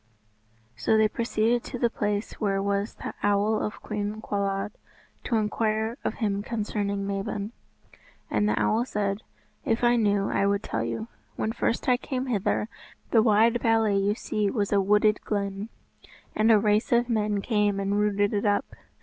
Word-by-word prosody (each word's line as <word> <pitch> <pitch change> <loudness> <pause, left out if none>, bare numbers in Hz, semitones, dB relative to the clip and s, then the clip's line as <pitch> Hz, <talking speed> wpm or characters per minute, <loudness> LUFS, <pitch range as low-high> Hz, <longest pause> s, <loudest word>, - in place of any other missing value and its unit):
So 120 - +2
they 220 0 +5
proceeded 230 +1 0
to 250 - -5
the 235 -1 +1
place 205 -1 -2
where 195 -2 +1
was 200 +2 -1
the - - -6
Owl 205 +1 +2
of 210 - -4
Cwm 210 0 -3
Cawlwyd, 200 0 -2 0.5
to 240 - 0
inquire 220 +1 0
of - - -2
him 205 -3 -1
concerning 205 -2 -2
Mabon. 200 +1 -3 0.8
And 210 - +1
the - - +1
owl 225 +2 +2
said, 205 -4 -2 0.4
"If 225 +1 0
I 240 0 +4
knew 205 -3 +2
I 200 - +1
would 200 +1 0
tell - - -2
you. 220 - -3 0.3
When 220 - -1
first 230 - -1
I 250 -1 +4
came 260 0 -3
hither, 215 -3 0 0.4
the 225 - +6
wide 225 +2 +4
valley 225 -3 +3
you 200 +1 +1
see 210 -3 -1
was 205 -1 -1
a 200 - +4
wooded 210 +2 +3
glen. 200 0 -3 0.7
And 220 +1 +4
a 220 - +7
race 210 +1 +1
of 240 0 +3
men 210 -3 0
came 205 -2 +1
and 200 +1 0
rooted 205 0 +1
it 205 - 0
up. 205 0 0
210 Hz, 170 wpm, -26 LUFS, 200-225 Hz, 0.8 s, a